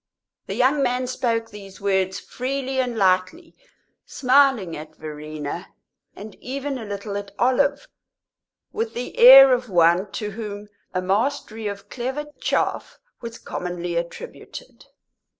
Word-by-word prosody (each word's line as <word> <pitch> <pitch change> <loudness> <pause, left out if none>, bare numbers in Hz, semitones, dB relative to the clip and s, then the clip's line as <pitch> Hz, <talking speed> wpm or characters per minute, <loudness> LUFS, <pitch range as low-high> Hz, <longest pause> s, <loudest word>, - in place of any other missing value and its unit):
The - - -4
young 275 +3 +2
man 250 -1 0
spoke 230 -3 -2
these 195 -2 -11
words 190 -1 0
freely 265 +1 -3
and 245 -3 -1
lightly, 190 - +1 0.5
smiling 255 -9 +2
at 155 +1 -10
Verena, 155 +2 -7 0.5
and 210 +1 -10
even 275 +1 -4
a 225 - -7
little 200 0 -5
at 205 0 -6
Olive, 280 - +1 0.9
with 450 +1 -3
the 245 - -5
air 265 +2 +10
of 250 -1 -1
one 175 +2 +3
to 210 +3 -4
whom 205 -1 -7 0.2
a 185 0 -2
mastery 220 +2 -1
of 200 -1 -6
clever 260 +4 -4
"chaff" - - -1 0.2
was 230 -1 -7
commonly 175 -1 -5
attributed. 170 - -7
220 Hz, 130 wpm, -23 LUFS, 190-260 Hz, 0.9 s, air